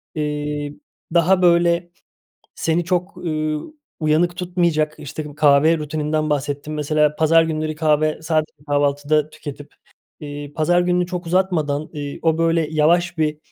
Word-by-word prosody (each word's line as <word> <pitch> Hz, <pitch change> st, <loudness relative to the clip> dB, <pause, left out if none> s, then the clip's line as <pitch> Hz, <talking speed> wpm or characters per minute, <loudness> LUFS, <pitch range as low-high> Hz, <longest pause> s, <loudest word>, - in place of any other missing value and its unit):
eee, 150 Hz, -1 st, -3 dB, 0.4 s
daha, 180 Hz, +2 st, +4 dB
böyle, 170 Hz, 0 st, +3 dB, 0.7 s
seni 165 Hz, +1 st, 0 dB
çok, 180 Hz, +1 st, -1 dB
ııı, 155 Hz, -, -3 dB, 0.3 s
uyanık 160 Hz, +3 st, +2 dB
tutmayacak, 170 Hz, -4 st, 0 dB
işte, 150 Hz, +1 st, -7 dB
kahve 150 Hz, +2 st, +4 dB
rutininden 155 Hz, 0 st, -2 dB
bahsettin. 145 Hz, +1 st, -2 dB
Mesela 150 Hz, 0 st, +1 dB
pazar 165 Hz, +1 st, +4 dB
günleri 155 Hz, -1 st, -2 dB
kahve 155 Hz, 0 st, +1 dB
sadece 155 Hz, -1 st, 0 dB, 0.2 s
kahvaltıda 145 Hz, +1 st, +1 dB
tüketip, 145 Hz, -2 st, -9 dB, 0.5 s
eee, 145 Hz, -1 st, -7 dB
pazar 175 Hz, +3 st, +3 dB
gününü 180 Hz, 0 st, +1 dB
çok 180 Hz, -1 st, -5 dB
uzatmadan, 165 Hz, -4 st, 0 dB
eee, 145 Hz, -1 st, -6 dB
o 160 Hz, -1 st, +2 dB
böyle 165 Hz, -1 st, +2 dB
yavaş 170 Hz, +3 st, +2 dB
bir, 155 Hz, -1 st, 0 dB
155 Hz, 130 wpm, -20 LUFS, 150-170 Hz, 0.7 s, daha